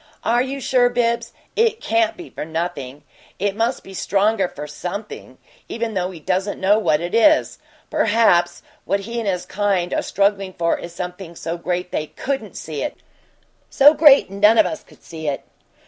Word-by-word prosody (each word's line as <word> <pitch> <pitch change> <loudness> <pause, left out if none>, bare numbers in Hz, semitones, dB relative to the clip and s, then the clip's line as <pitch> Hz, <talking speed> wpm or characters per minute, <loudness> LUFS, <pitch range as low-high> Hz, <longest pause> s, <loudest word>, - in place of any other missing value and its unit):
"Are 240 +2 +2
you 270 +2 -3
sure, 250 -2 +3
Bibbs? 235 -1 0 0.2
It 450 0 +2
CAN'T 340 -1 +1
be 350 -2 -10
for - - -6
nothing; 155 -4 -5 0.3
it 200 +1 -1
must 230 +4 -1
be 195 - -12
stronger 200 +1 +1
for 150 -3 -8
something, 180 +8 -7 0.3
even 230 -1 -3
though 185 -2 -1
he 180 -3 -10
doesn't 190 +5 -2
know 200 +3 +3
what 155 -7 +1
it 175 +1 -4
is. 305 +7 +3 0.3
Perhaps 175 -7 +2 0.2
what 200 - 0
he 230 +4 -4
and 225 - -3
his 180 -2 -2
kind 195 -4 -1
are - - +1
struggling 195 -1 0
for 170 -2 0
is 170 - -8
something 180 0 -7
so 165 +1 -4
great 180 +1 -3
they 155 - -2
COULDN'T 275 0 -4
see - - -5
it - - -3 0.7
so 290 +2 +6
great 290 -9 +6
none 210 +3 +4
of - - +6
us 210 - -4
could - - -21
see 160 -2 -7
it." 140 -2 -2
200 Hz, 180 wpm, -21 LUFS, 175-235 Hz, 0.7 s, so